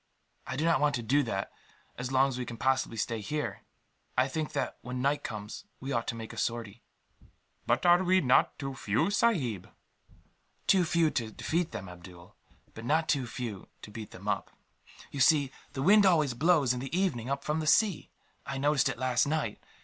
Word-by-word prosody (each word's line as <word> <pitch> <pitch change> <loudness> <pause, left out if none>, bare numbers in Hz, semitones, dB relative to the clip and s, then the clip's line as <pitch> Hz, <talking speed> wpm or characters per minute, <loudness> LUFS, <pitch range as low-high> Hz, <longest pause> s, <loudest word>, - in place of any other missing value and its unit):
"I 130 - -3
do 150 +4 -1
not 165 -1 +3
want 145 0 +3
to 120 - -3
do 140 +6 +3
that, 95 -7 -3 0.4
as 125 +1 -5
long 135 +1 +4
as 130 -1 -5
we - - -1
can 120 -1 -7
possibly 130 -2 0
stay 115 0 -2
here. 150 +9 -3 0.6
I 130 +1 +4
think 150 +2 -3
that, 140 - -2
when 125 +1 -5
night 140 +3 +1
comes, 105 -2 -6
we 135 +2 -5
ought 115 -3 -1
to - - -2
make 115 0 -7
a - - -11
sortie." 115 -1 -3 0.9
"But - - +1
are 175 +1 +6
we 185 +1 +4
not 130 -6 +3
too 135 -1 -4
few, 120 - 0
sahib?" 145 - +1 1.0
"Too 185 -3 +4
few 165 -1 +2
to 115 -3 -2
defeat 165 +9 -1
them, 105 -5 -6
Abdool, 90 0 -13 0.4
but 115 - -9
not 155 +6 +1
too 135 -4 +1
few 115 -5 -6 0.2
to 105 - -9
beat 110 0 -7
them - - -11
up. - - -1 0.6
You 140 - -6
see, 140 0 +4 0.2
the 135 - -3
wind 205 +3 +6
always 155 -8 +3
blows, 145 -1 +3
in 125 - -4
the 135 +7 -3
evening, 135 -11 0
up 140 0 -2
from 150 +1 -1
the 155 - -3
sea. 205 +2 +3 0.3
I 135 - -5
noticed 145 0 +2
it - - -4
last 130 +1 +1
night. 150 -8 -2
135 Hz, 200 wpm, -30 LUFS, 115-155 Hz, 1.0 s, are